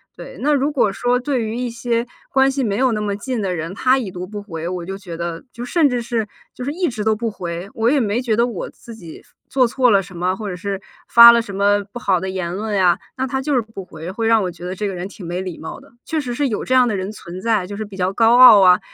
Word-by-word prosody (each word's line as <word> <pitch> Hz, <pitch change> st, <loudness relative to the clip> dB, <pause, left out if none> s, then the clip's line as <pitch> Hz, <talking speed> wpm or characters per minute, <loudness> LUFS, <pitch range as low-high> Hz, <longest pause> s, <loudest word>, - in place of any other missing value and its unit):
对。 -, -, -10 dB
那 295 Hz, +2 st, +2 dB
如 285 Hz, +2 st, +1 dB
果 245 Hz, -8 st, +2 dB
说 245 Hz, +3 st, +1 dB
对 255 Hz, -2 st, -1 dB
于 220 Hz, +2 st, -4 dB
一 250 Hz, -1 st, -2 dB
些 235 Hz, 0 st, -2 dB, 0.2 s
关 270 Hz, 0 st, +4 dB
系 270 Hz, 0 st, -1 dB
没 205 Hz, -4 st, -1 dB
有 255 Hz, -1 st, +2 dB
那 210 Hz, -, -2 dB
么 205 Hz, -1 st, -2 dB
近 240 Hz, +1 st, -3 dB
的 185 Hz, -2 st, -1 dB
人， 165 Hz, +2 st, -4 dB
他 255 Hz, +6 st, +2 dB
已 225 Hz, -7 st, -3 dB
读 180 Hz, 0 st, -6 dB
不 205 Hz, +2 st, -7 dB
回， 170 Hz, -4 st, -6 dB
我 180 Hz, -2 st, -4 dB
就 195 Hz, +1 st, -5 dB
觉 175 Hz, -5 st, -8 dB
得， 170 Hz, -1 st, -5 dB
就 240 Hz, +1 st, -7 dB
甚 300 Hz, +3 st, +3 dB
至 245 Hz, -2 st, -1 dB
是 230 Hz, -2 st, -2 dB, 0.3 s
就 250 Hz, -, -7 dB
是 280 Hz, -, -2 dB
一 350 Hz, +2 st, -1 dB
直 220 Hz, -4 st, -4 dB
都 220 Hz, -, +2 dB
不 225 Hz, +1 st, -2 dB
回， 175 Hz, -1 st, -6 dB
我 225 Hz, +1 st, +1 dB
也 290 Hz, -, +3 dB
没 225 Hz, +1 st, 0 dB
觉 230 Hz, -4 st, 0 dB
得 235 Hz, +1 st, +3 dB
我 225 Hz, -7 st, -5 dB
自 230 Hz, -2 st, -13 dB
己 170 Hz, -7 st, -11 dB, 0.3 s
做 255 Hz, -3 st, +2 dB
错 250 Hz, -1 st, +2 dB
了 200 Hz, -, +4 dB
什 180 Hz, -2 st, -12 dB
么， 180 Hz, +2 st, 0 dB
或 210 Hz, -1 st, -6 dB
者 180 Hz, -, -4 dB
是 195 Hz, +2 st, -4 dB, 0.3 s
发 235 Hz, 0 st, +10 dB
了 235 Hz, -, +4 dB
什 205 Hz, -4 st, -6 dB
么 205 Hz, +1 st, +2 dB
不 240 Hz, -, -6 dB
好 190 Hz, -5 st, +1 dB
的 190 Hz, -, -4 dB
言 185 Hz, -2 st, -3 dB
论 215 Hz, +1 st, -3 dB
呀。 180 Hz, -3 st, +3 dB, 0.2 s
那 265 Hz, 0 st, -2 dB
他 265 Hz, +1 st, -2 dB
就 295 Hz, -, -1 dB
是 250 Hz, -, +3 dB
不 215 Hz, -4 st, -10 dB
回， 160 Hz, +1 st, -9 dB
会 225 Hz, +4 st, -3 dB
让 225 Hz, -1 st, +4 dB
我 185 Hz, -, -1 dB
觉 175 Hz, +1 st, -11 dB
得 180 Hz, -, -4 dB
这 205 Hz, +2 st, -2 dB
个 190 Hz, -, -4 dB
人 180 Hz, +2 st, -5 dB
挺 200 Hz, -1 st, -12 dB
没 175 Hz, +1 st, -3 dB
礼 185 Hz, -3 st, -6 dB
貌 160 Hz, -, -7 dB
的。 -, -, -20 dB
确 315 Hz, -, -2 dB
实 250 Hz, -4 st, -4 dB
是 285 Hz, +2 st, 0 dB
有 220 Hz, -, -3 dB
这 255 Hz, -, -1 dB
样 250 Hz, -1 st, +5 dB
的 215 Hz, -, -1 dB
人 190 Hz, +2 st, -4 dB
存 180 Hz, -4 st, -9 dB
在， 215 Hz, -5 st, 0 dB
就 205 Hz, -, -7 dB
是 215 Hz, -, -4 dB
比 200 Hz, -1 st, -12 dB
较 185 Hz, 0 st, 0 dB
高 230 Hz, +3 st, +4 dB
傲 225 Hz, -6 st, +10 dB
啊， 180 Hz, -1 st, +6 dB
215 Hz, 315 characters per minute, -20 LUFS, 185-245 Hz, 0.3 s, 发